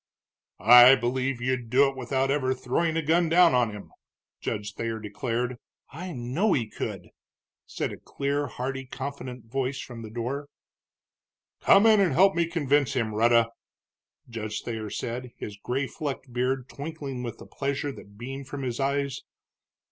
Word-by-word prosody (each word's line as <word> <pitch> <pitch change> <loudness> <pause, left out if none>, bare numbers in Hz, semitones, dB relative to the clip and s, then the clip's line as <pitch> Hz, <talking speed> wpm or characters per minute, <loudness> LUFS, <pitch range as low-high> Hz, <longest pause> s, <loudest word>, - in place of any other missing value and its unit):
"I 120 +5 +9
believe 125 +1 -1
you'd 130 -2 -1
do 135 +4 +5
it 135 - -4
without 130 +1 0
ever 130 -2 +1
throwing 160 +6 0
a 165 - 0
gun 165 +2 +3
down 170 0 +6
on 125 -2 +3
him," 105 -1 -9 0.5
Judge 105 -1 -4
Thayer 115 0 -3
declared. 120 +3 -3 0.3
"I 180 +7 -6
know 145 - 0
he 115 -4 0
could!" - - -6 0.6
said - - -3
a - - -8
clear, 140 +1 -2
hearty, 135 +2 -4
confident 130 -3 -6
voice 135 +3 -2
from 120 -2 -8
the 110 - -8
door. 125 +6 -4 1.1
"Come 200 +2 +6
in 220 -2 +7
and 185 -7 +3
help 195 +6 +5
me 170 -1 +1
convince 145 -4 +1
him, 115 -5 -1
Rhetta," 115 +1 +4 0.8
Judge 110 -2 -5
Thayer 110 -2 -4
said, 125 +3 -5
his 105 - -6
gray 125 +6 -2
flecked 135 -2 -5
beard 125 +1 0
twinkling 140 -3 -6
with 120 -2 -5
the - - -12
pleasure 140 +1 -2
that 100 -6 -13
beamed 135 +3 -7
from 140 0 -5
his 125 -1 -3
eyes. 140 -1 -1
130 Hz, 160 wpm, -27 LUFS, 120-140 Hz, 1.1 s, I